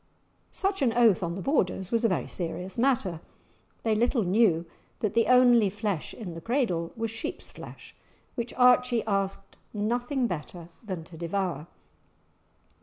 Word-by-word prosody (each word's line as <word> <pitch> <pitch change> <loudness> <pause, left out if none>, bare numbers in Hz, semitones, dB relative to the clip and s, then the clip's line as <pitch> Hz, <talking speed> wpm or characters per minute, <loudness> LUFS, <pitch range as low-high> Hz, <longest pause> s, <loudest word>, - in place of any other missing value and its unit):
Such 390 -3 -1
an 245 -4 +3
oath 230 -5 +4
on 170 -1 -2
the 190 - -5
Borders 190 - 0
was 230 0 +1
a 230 - +4
very 185 - -1
serious 180 +2 -4
matter; 230 -10 +1 0.6
they 225 - +2
little 235 +2 +2
knew 180 -3 +3 0.3
that 215 - -1
the 230 0 +3
only 245 -4 +6
flesh 205 -4 -3
in 190 -7 -7
the 165 - -8
cradle 205 - 0
was 225 -1 -2
sheep's 225 0 -6
flesh, - - -11 0.4
which 235 -1 -4
Archie 250 -1 +4
asked 195 -2 -2 0.2
nothing 245 +5 0
better 175 -3 -5
than 185 -6 -5
to 165 0 -13
devour! 170 -3 -2
215 Hz, 150 wpm, -27 LUFS, 180-240 Hz, 0.6 s, only